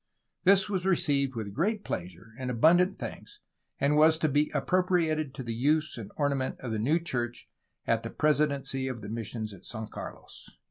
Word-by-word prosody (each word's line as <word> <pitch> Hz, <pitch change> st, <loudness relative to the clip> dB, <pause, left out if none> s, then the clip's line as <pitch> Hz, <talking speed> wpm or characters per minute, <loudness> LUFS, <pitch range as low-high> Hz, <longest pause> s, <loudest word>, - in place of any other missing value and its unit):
This 195 Hz, +1 st, +6 dB
was 190 Hz, -3 st, -1 dB
received 140 Hz, -8 st, +2 dB
with 105 Hz, -3 st, -5 dB
great 205 Hz, -, 0 dB
pleasure, 90 Hz, +4 st, -6 dB
and 130 Hz, -1 st, -3 dB
abundant 170 Hz, -, +4 dB
thanks, 415 Hz, -, -8 dB, 0.4 s
and 140 Hz, +1 st, +2 dB
was 155 Hz, +1 st, +6 dB
to 160 Hz, -1 st, +1 dB
be 145 Hz, +2 st, +2 dB
appropriated 170 Hz, -5 st, +1 dB
to 130 Hz, -, -5 dB
the 115 Hz, -1 st, -3 dB
use 150 Hz, +6 st, +1 dB
and 110 Hz, -4 st, -7 dB
ornament 140 Hz, -3 st, 0 dB
of 125 Hz, -, -4 dB
the 110 Hz, -, -1 dB
new 140 Hz, +10 st, +2 dB
church 120 Hz, -8 st, -3 dB, 0.4 s
at -, -, +1 dB
the -, -, -5 dB
presidency 145 Hz, -3 st, +1 dB
of 125 Hz, -3 st, -5 dB
the 105 Hz, -, -6 dB
missions 110 Hz, -1 st, -4 dB
at 95 Hz, -, -14 dB
St. 110 Hz, -2 st, -7 dB
Carlos." -, -, -9 dB
140 Hz, 180 wpm, -29 LUFS, 115-160 Hz, 0.4 s, This